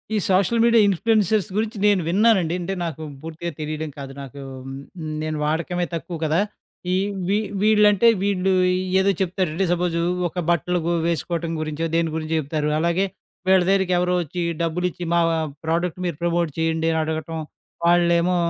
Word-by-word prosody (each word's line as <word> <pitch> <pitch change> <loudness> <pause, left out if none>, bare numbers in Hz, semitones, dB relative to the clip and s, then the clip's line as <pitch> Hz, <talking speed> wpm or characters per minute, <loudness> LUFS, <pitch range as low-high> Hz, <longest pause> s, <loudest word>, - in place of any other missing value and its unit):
ఈ - - +2
social 195 +5 +3
media 235 -1 +5
influencers 210 +1 +2
గురించి 220 +1 -1
నేను 200 -3 +3
విన్నానండి. 185 -2 +3
అంటే, 190 +3 -3
నాకు 160 -2 -5 0.2
పూర్తిగా 165 +2 -5
తెలియడం 155 0 -3
కాదు 135 -1 -7
నాకు. 140 +1 -9 0.8
నేను 155 0 -2
వాడకమే 170 +3 -1
తక్కువ 165 +1 -5
కదా! 155 +2 +2 0.5
ఈ - - +3 0.3
వీ 200 +2 +2 0.2
వీళ్ళంటే 210 0 +5
వీళ్ళు 195 -1 +1 0.5
ఏదో 195 +1 +3
చెప్తారండి. 185 -1 0
సపోజు 175 -1 0 0.3
ఒక 170 - -12
బట్టలుగు 175 +1 +1 0.2
వేసుకోవటం 170 0 -2
గురించో 155 +1 -2
దేని 165 -1 +2
గురించో 160 0 -2
చెప్తారు. 150 +1 -2
అలాగే 170 +4 +1 0.4
వీళ్ళ 190 -1 +6
దగ్గరికి 190 -2 +2
ఎవరో 180 0 +1
వచ్చి 175 +2 -4 0.2
డబ్బులు 170 +2 -1
ఇచ్చి 180 +1 -8
మా 170 - +4
వా 165 - +1 0.3
ప్రొడక్ట్ 170 +2 -1
మీరు 170 - -2
ప్రమోట్ 170 -1 +1
చేయండి 160 0 0
అని 160 - 0
అడగటం, 160 +1 -3 0.5
వాళ్ళేమో 175 +1 +3
170 Hz, 150 wpm, -22 LUFS, 160-190 Hz, 0.8 s, వీళ్ళ